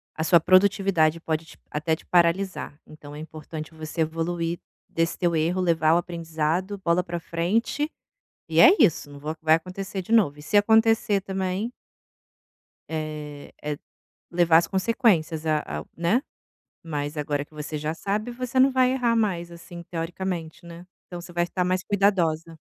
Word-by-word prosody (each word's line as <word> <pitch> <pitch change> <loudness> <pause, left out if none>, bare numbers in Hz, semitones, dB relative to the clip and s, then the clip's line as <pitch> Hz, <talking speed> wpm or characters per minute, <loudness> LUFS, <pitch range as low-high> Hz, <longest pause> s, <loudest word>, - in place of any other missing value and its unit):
a 160 - -2
sua 170 0 +5
produtividade 185 -4 +3
pode 160 -1 -4
até 160 +2 0
te - - -18
paralisar, 175 -3 +1
então 150 -1 -12
é - - -8
importante 155 0 -8
você 160 +1 -5
evoluir 165 +1 -2 0.3
desse 165 0 -1
teu 170 -2 +1
erro, 170 +4 +1
levar 165 -3 +3
o - - +5
aprendizado, 170 +3 -2
bola 170 +2 +3
para 175 -1 -4
frente, 210 - -1 0.6
e - - +1
é - - +10
isso, 170 - +3
não 145 - -11
vo 155 +2 -4
vai 160 0 +5
acontecer 190 +3 -5
de 220 - -9
novo, 190 -11 +4
e 150 - -12
se 205 - -3
acontecer 220 -1 +4
também 190 +4 -2 1.2
é, 150 -2 -6
é 150 -1 -3 0.5
levar 170 -2 +5
as 170 - +1
consequências 190 -7 +1
a 155 -1 +2 0.2
a, - - -10
né, 175 +10 +2 0.6
mas 150 -2 -4
agora 145 -1 -2
que 155 - -24
você 150 0 -5
já 155 +2 -3
sabe 210 +6 -2
você 250 +1 -3
não 270 +1 +6
vai 255 -1 +3
errar 240 -3 +1
mais 180 -6 0
assim 170 0 -10
teoricamente, 170 -1 -4
né, 170 +1 -11 0.2
então 175 -1 -7
você 175 0 -11
vai 175 0 +1
estar 180 +1 -2
mais 185 0 0
cuidadosa. 170 -5 +1
170 Hz, 165 wpm, -25 LUFS, 160-190 Hz, 1.2 s, é